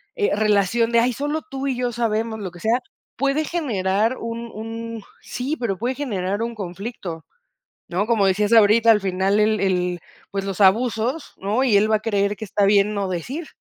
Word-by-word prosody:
eh, 415 - +1
relación 215 +2 +2
de, 235 - +4
ay, 245 +2 +2
solo 295 +5 -2
tú 270 0 -4
y 265 - 0
yo 245 0 -1
sabemos 225 -1 -1
lo 190 -4 -5
que 175 - -13
sea, 225 +6 +1 0.4
puede 275 +3 +1
generar 225 - 0
un 230 0 -5
un 225 0 -6 0.2
sí, 275 +5 -4
pero 215 -6 -1
puede 245 +5 -2
generar 205 -7 -2
un 230 0 -3
conflicto, 185 -3 -6 0.6
¿no? 185 +4 -1
Como 225 -4 +3
decías 205 +3 +1
ahorita, 225 +1 +6
al 210 - +4
final 190 +2 +1
el 215 0 +2
el 180 -2 0 0.3
pues, 195 -1 -2
los 195 -1 -4
abusos, 230 +7 +2
¿no? 210 +7 0
Y 230 -6 +4
él 210 +2 +3
va 215 - +4
a - - -12
creer 205 -2 0
que - - -8
está 205 +1 +1
bien 200 +1 +3
no 200 -1 -1
decir. 255 - -4
220 Hz, 195 wpm, -22 LUFS, 195-235 Hz, 0.6 s, ahorita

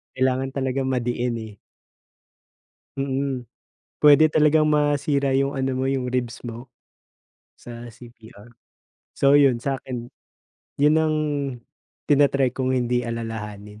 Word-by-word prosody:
Kailangan 130 0 0
talagang 130 0 -1
madiin, 120 -1 -1
eh. 110 -2 -11 1.4
Mm. 135 -1 -2 0.6
Puwede 150 +1 +7
talagang 155 0 +4
masira 145 -2 +1
yung 135 +1 +1
ano 135 -1 -1
mo 130 - -1
yung 135 -2 -1
ribs 125 -2 -3
mo, 120 +2 -8 0.9
sa 120 0 -10
CPR, 115 -2 -15 0.6
so, 140 +1 +3
'yon. 135 -4 +4
Sa'kin 130 -2 -4 0.7
'yon 150 +2 +4
ang 155 -1 +1 0.9
ti-na-try 140 -3 +3
kong 130 0 -1
hindi 125 0 0
alalahanin 105 -3 -6
130 Hz, 110 wpm, -23 LUFS, 120-140 Hz, 1.4 s, Puwede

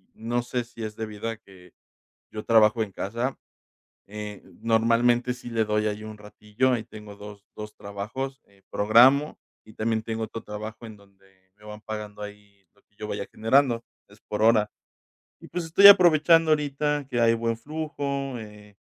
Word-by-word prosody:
no 120 +2 -2
sé 120 0 -3
si 115 -1 -10
es 105 -1 -6
debido 110 0 -6
a 115 - -4
que, 95 -5 -19 0.6
yo 105 -1 -6
trabajo 110 0 +4
en 100 - -9
casa, 115 +8 -3 0.7
eh, 105 -1 -8 0.2
normalmente 115 +2 +2
sí 125 -1 -11
le 115 -1 +1
doy 105 0 0
ahí 105 0 -3
un 110 -1 -9
ratillo, 105 +4 -2
ahí 120 -3 -1
tengo 105 -1 -12
2- 105 -1 -12
2, 105 0 -8
trabajos, 110 +8 -6
eh, 100 -1 -27
programo 125 +8 +4 0.3
y 110 - -16
también 110 0 -1
tengo 110 0 -3
otro 115 +1 -8
trabajo 110 +2 -8
en 110 -2 -11
donde 95 -1 -26
me 105 - -21
van 105 0 -9
pagando 105 -1 -7
ahí, 105 -1 -12
lo 105 - -30
que - - -42
yo 105 - -7
vaya 100 - -4
generando, 120 +1 +2 0.2
es - - -20
por 105 0 -2
hora 110 -2 +4 0.7
y, - - -13
pues, 175 -2 -4
estoy 195 +5 +7
aprovechando 165 -4 +6
ahorita 145 -1 0
que 120 -2 0
hay 115 0 +4
buen 115 0 -2
flujo, 140 -1 -4
eh, 105 -1 -13
110 Hz, 175 wpm, -25 LUFS, 105-125 Hz, 0.7 s, estoy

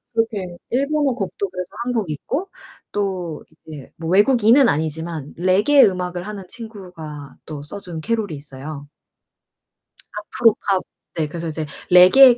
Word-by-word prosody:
그렇게 205 -6 -1
일본어 280 +2 +2
곡도 195 -2 -3
그래서 180 -1 -5 0.2
1 250 - -1
곡 215 -9 -1
있고 280 - -3 0.4
또 185 -5 -3 0.2
이제 150 -4 -10
뭐 165 +1 -4
외국인은 235 +5 +6
아니지만 160 -1 -2
레게 195 - +5
음악을 180 -2 0
하는 210 -2 -6
친구가 180 - -9
또 150 -2 -7
써준 170 +1 -6
캐럴이 215 -1 -1
있어요. 140 +1 -8 1.3
아프로 215 +2 +2
팝 190 -2 +3 0.3
네 160 -2 0
그래서 170 +2 -5
이제 155 0 -3 0.2
레게의 235 +8 +9
185 Hz, 280 characters per minute, -21 LUFS, 160-225 Hz, 1.3 s, 레게의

